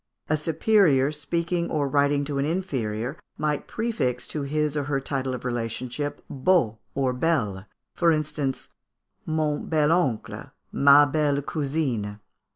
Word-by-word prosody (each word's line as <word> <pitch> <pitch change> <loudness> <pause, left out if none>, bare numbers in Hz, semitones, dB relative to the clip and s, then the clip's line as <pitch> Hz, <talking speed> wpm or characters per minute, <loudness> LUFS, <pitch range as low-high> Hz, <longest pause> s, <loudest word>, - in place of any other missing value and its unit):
A 155 - +3
superior 155 -3 +3
speaking 170 +3 -2
or 145 -2 0
writing 145 0 +2
to 140 -1 -2
an 140 - +1
inferior, 135 - -2 0.2
might 150 -1 -1
prefix 135 - -1
to 150 - -3
his 150 +1 -1
or 145 -2 -1
her 140 -1 0
title 135 -1 -2
of 125 - -8
relationship 125 +4 -3
beau 130 - +1 0.2
or 130 -2 +1
belle; 120 - 0 0.3
for 170 -1 +3
instance, 150 -3 -2 0.6
mon 155 -2 -1
bel 155 -1 +2
oncle, 140 -11 -1 0.2
ma 140 +1 +7
belle 145 0 +1
cousine. 135 -10 -2
145 Hz, 135 wpm, -25 LUFS, 130-155 Hz, 0.6 s, ma